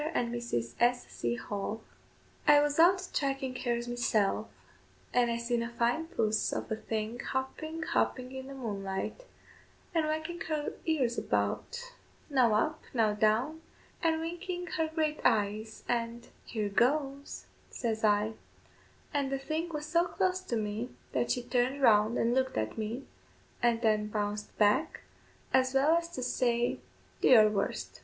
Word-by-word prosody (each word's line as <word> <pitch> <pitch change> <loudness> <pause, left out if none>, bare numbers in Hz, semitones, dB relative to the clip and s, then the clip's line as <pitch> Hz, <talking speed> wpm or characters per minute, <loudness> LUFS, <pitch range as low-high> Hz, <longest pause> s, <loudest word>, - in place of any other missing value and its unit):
AND 235 -1 0
MRS. 120 - -2
S. 245 +1 +3
C. 120 0 -2
HALL. 200 - -4 0.7
I 295 -1 +8
was 290 +1 +1
out 360 +3 +7
thracking 275 -7 -2
hares 240 -1 -1
meeself, 225 -3 +1 0.7
and 245 -1 +3
I 235 - 0
seen 235 0 0
a 230 - -3
fine 240 +7 0
puss 220 - 0
of - - -4
a - - +2
thing 220 +1 -3
hopping, 310 +6 -3
hopping 260 -5 0
in 265 0 -7
the 275 - -8
moonlight, 200 - -4 0.7
and 320 -2 +2
whacking 315 +2 -3
her 305 -2 -1
ears 260 -7 +1
about, 285 - -2 0.4
now 245 -6 +4
up, 310 +9 +1
now 220 -3 +3
down, 225 +10 +1 0.4
and 325 -1 +2
winking 350 +2 -4
her 320 -2 +1
great 315 -1 -1
eyes, 215 0 +1
and 235 0 -2 0.2
"Here 215 -3 -2
goes," 275 +5 0 0.2
says 225 -2 -2
I, 210 +1 +3 0.8
and 280 -2 0
the 275 - +1
thing 310 +5 -3
was 300 -2 -4
so 340 +3 +2
close 370 +1 0
to 310 -10 -3
me 215 +2 -2 0.2
that - - 0
she 245 - 0
turned 250 +2 +1
round 220 -3 +5
and 235 +1 +2
looked 260 0 +1
at 110 0 -1
me, 225 +5 -3 0.6
and 235 -1 +2
then 215 -1 +3
bounced 210 0 -3
back, 210 +10 +2 0.5
as 260 0 +3
well 290 +5 +5
as 335 0 0
to 255 - -3
say, 240 -1 +1 0.4
do - - +4
your 215 -4 +8
worst! 200 -1 -2
245 Hz, 155 wpm, -31 LUFS, 220-305 Hz, 0.8 s, I